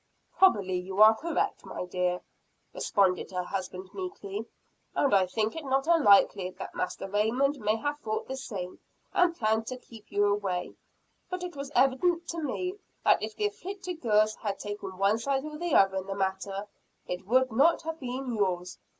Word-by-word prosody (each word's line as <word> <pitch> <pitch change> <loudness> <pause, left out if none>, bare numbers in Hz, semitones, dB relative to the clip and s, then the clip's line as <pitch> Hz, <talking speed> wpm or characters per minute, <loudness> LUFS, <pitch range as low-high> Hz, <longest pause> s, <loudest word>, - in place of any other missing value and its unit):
"Probably 195 - +4
you 190 +2 -5
are 220 +1 +9
correct, 330 +9 -2
my - - -5
dear," 180 0 -1 0.5
responded 190 -3 +1
her 180 -1 -2
husband 185 0 -5
meekly; 225 - -5 0.5
"and 280 - +2
I 190 -2 +5
think 220 +3 -1
it 320 - -5
not 270 0 +1
unlikely 205 - +5
that - - -7
Master 195 - -3
Raymond 240 +8 +1
may 215 0 +1
have 290 +6 -2
thought 215 -5 -3
the 265 - -4
same, 195 -9 -6 0.3
and 355 -1 +3
planned 220 0 +1
to 255 - -4
keep 225 -4 -15
you 205 0 +3
away 200 -3 -1 0.6
but 365 0 -4
it 355 -3 -6
was 280 0 -6
evident 330 +7 +3
to 335 -1 -3
me, 365 +7 -3 0.3
that - - +5
if - - -4
the 420 - -1
'afflicted 375 -4 -5
girls' 215 -2 +3
had 205 -3 -3
taken 205 -2 -6
one 200 +3 +3
side 270 +3 -1
or 305 0 -7
the 345 -3 0
other 195 -1 +5
in 190 0 -4
the 195 - -3
matter, 195 +1 -2 0.4
it 180 +1 -5
would 255 +2 +3
not 295 +11 +4
have 325 0 -4
been 255 -1 -4
yours. 180 -4 -1
220 Hz, 180 wpm, -29 LUFS, 195-290 Hz, 0.6 s, are